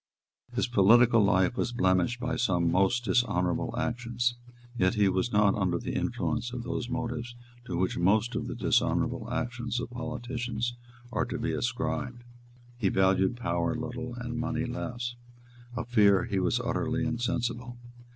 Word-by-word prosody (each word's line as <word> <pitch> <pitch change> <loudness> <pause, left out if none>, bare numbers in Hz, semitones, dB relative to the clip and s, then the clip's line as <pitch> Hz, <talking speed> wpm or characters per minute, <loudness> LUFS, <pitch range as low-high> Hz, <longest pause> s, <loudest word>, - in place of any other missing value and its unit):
His - - +2
political 115 +1 +5
life 95 +1 +3
was 120 - -1
blemished 95 +2 +2
by 125 - -2
some 90 -7 +1
most 100 +7 +2
dishonourable 90 -5 +1
actions; 120 0 -1 0.4
yet 95 -5 +2
he 105 -2 +4
was 95 +5 0
not 105 -1 +4
under 95 -4 0
the - - -4
influence 115 +1 -1
of 125 -1 -5
those 120 0 -3
motives 120 -1 -3 0.3
to 90 - -3
which 90 0 0
most 105 +7 +3
of - - -3
the - - -4
dishonourable 110 - +1
actions 120 -1 -2
of 120 - -5
politicians 120 -1 -3 0.4
are - - 0
to - - -4
be - - -1
ascribed. 120 0 -2 0.6
He 100 -5 +2
valued 95 +4 +2
power 85 -4 -1
little 125 0 -5
and 120 -1 -4
money 125 - -1
less. 120 0 -4 0.6
Of 120 - -3
fear 100 -5 +5
he 100 - -1
was 90 - +1
utterly - - -1
insensible. 120 0 -2
120 Hz, 150 wpm, -29 LUFS, 95-120 Hz, 0.6 s, political